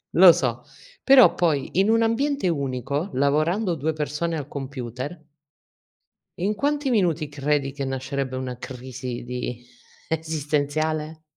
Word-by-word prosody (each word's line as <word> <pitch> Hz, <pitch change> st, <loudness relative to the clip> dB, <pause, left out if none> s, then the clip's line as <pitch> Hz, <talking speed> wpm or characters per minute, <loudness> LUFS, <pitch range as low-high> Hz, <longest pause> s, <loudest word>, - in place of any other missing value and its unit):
Lo -, -, +10 dB
so. -, -, -1 dB, 0.4 s
Però 265 Hz, -2 st, +7 dB
poi 155 Hz, -6 st, +1 dB
in 195 Hz, +3 st, +3 dB
un 225 Hz, 0 st, +4 dB
ambiente 275 Hz, +2 st, +1 dB
unico, 140 Hz, +1 st, -2 dB
lavorando 155 Hz, -, +1 dB
2 160 Hz, +1 st, -1 dB
persone 155 Hz, +2 st, -2 dB
al 145 Hz, -3 st, -5 dB
computer 135 Hz, +2 st, -6 dB, 1.2 s
in 200 Hz, +4 st, 0 dB
quanti 285 Hz, +4 st, 0 dB
minuti, 170 Hz, -, +1 dB
credi 145 Hz, -1 st, 0 dB
che 140 Hz, -1 st, -4 dB
nascerebbe 130 Hz, 0 st, -3 dB
una 130 Hz, -1 st, -4 dB
crisi 125 Hz, -1 st, -6 dB
di 125 Hz, 0 st, -5 dB, 0.4 s
esistenziale? 155 Hz, 0 st, -1 dB
150 Hz, 120 wpm, -24 LUFS, 135-170 Hz, 1.2 s, Lo